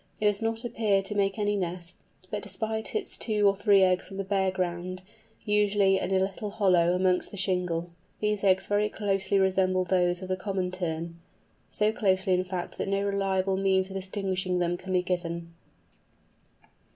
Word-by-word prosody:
It 210 - -1
does 205 0 +2
not 225 +1 -2
appear 210 -4 +1
to 200 +2 -4
make 200 0 0
any 205 -1 0
nest, 175 -2 -4 0.4
but 210 - -2
deposits 220 - -2
its 425 - -2
two 210 -3 +2
or 200 - +3
three 200 -1 +4
eggs 185 0 +1
on 195 - -8
the 195 - -2
bare 190 -1 +1
ground, 185 0 -3 0.4
usually 205 -2 +3
in - - -3
a 190 - +2
little 195 +2 -2
hollow 180 -4 +3
amongst 185 0 +1
the 200 - -9
shingle. 180 -3 0 0.3
These 210 -1 -1
eggs 190 -1 +3
very 205 +1 +1
closely 200 -2 0
resemble 185 -1 +2
those 180 0 +1
of 185 - -7
the 185 - +1
Common 185 -1 -2
Tern; 170 -2 -4 0.5
so 210 0 +1
closely 190 -3 +1
in 180 0 +2
fact 180 -1 -5
that - - -2
no 195 0 0
reliable 195 -1 0
means 190 -1 +2
of - - -8
distinguishing 190 -1 -2
them 175 0 0
can 185 +2 -8
be 180 -1 +2
given. 170 -2 -3
190 Hz, 180 wpm, -28 LUFS, 180-200 Hz, 0.5 s, three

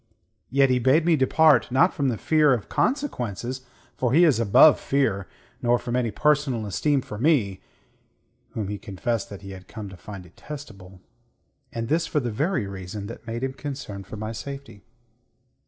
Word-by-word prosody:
Yet 135 0 +3
he 125 - +3
bade 135 +7 +3
me 170 -1 +4
depart; 155 +1 +4
not 165 +9 +4
from 140 -4 0
the 120 -4 0
fear 150 +3 +3
of 110 - -7
consequences, 130 - -2 0.3
for 125 -1 0
he 170 +4 +6
is 150 -9 +4
above 115 +7 +6
fear, 110 -9 0 0.3
nor 120 0 +3
from 120 0 -4
any 125 -2 +1
personal 145 -4 +1
esteem 140 +7 +1
for 105 -4 -8
me 115 - +2 0.9
whom 105 -3 -3
he 105 -1 -4
confessed 105 +3 -3
that 100 -1 -10
he 95 - -8
had 95 -1 -11
come 105 -3 -8
to 95 - -12
find 100 +1 -9
detestable; 95 - -11 0.7
and 115 0 -4
this 165 +5 +1
for 150 - 0
the 120 -4 -3
very 150 - 0
reason 100 +1 -7
that 115 +2 -10
made 115 +2 -4
him 135 0 -2
concerned 135 -9 -7
for 110 - -8
my 110 +1 -4
safety." 140 -2 -8
120 Hz, 175 wpm, -25 LUFS, 100-145 Hz, 0.9 s, he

